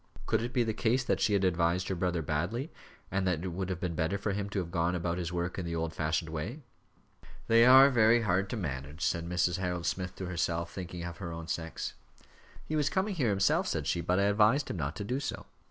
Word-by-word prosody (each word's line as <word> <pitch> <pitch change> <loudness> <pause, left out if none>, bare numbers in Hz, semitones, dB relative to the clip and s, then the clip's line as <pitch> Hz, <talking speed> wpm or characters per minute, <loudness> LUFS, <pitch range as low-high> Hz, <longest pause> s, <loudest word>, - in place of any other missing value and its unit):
Could 110 0 +1
it 120 +1 -3
be 125 -2 +2
the 110 -1 -1
case 120 +4 +1
that - - 0
she 105 - +2
had 100 -1 +2
advised 90 0 +1
her - - -1
brother 90 -2 -1
badly, 90 - -2 0.4
and 95 0 0
that 90 -2 0
it 95 - -2
would 90 +2 -4
have 90 -2 -3
been 90 -2 -2
better 80 +4 0
for 100 +1 -2
him 100 0 -3
to 100 - -5
have 85 -3 -2
gone 85 0 +1
about 85 0 -2
his 85 -1 -3
work 90 +1 -2
in - - -3
the 85 - -3
old 80 0 -2
fashioned 80 +1 -1
way? 100 - -5 0.8
"They 115 +1 +6
are 135 +2 +9
very 115 -1 +5
hard 95 -1 +1
to 120 - -3
manage," 75 -3 -4
said 85 0 -1
Mrs. 90 0 +1
Harold 90 -2 -2
Smith 90 -1 -2
to 95 - -5
herself, 85 -1 -2
thinking 90 -2 -6
of 85 0 -6
her 85 -4 -5
own 80 0 -7
sex. 80 -1 -4 0.7
"He 155 - -3
was 150 -1 +2
coming 195 +2 0
here 135 - +1
himself," 95 -1 +2
said 75 - -2
she, 85 +5 0
"but 90 +2 +1
I - - +3
advised 105 +7 +3
him - - -4
not 75 -1 -3
to 100 - -4
do 125 +6 -2
so." 140 - -5
90 Hz, 245 wpm, -30 LUFS, 85-110 Hz, 0.8 s, are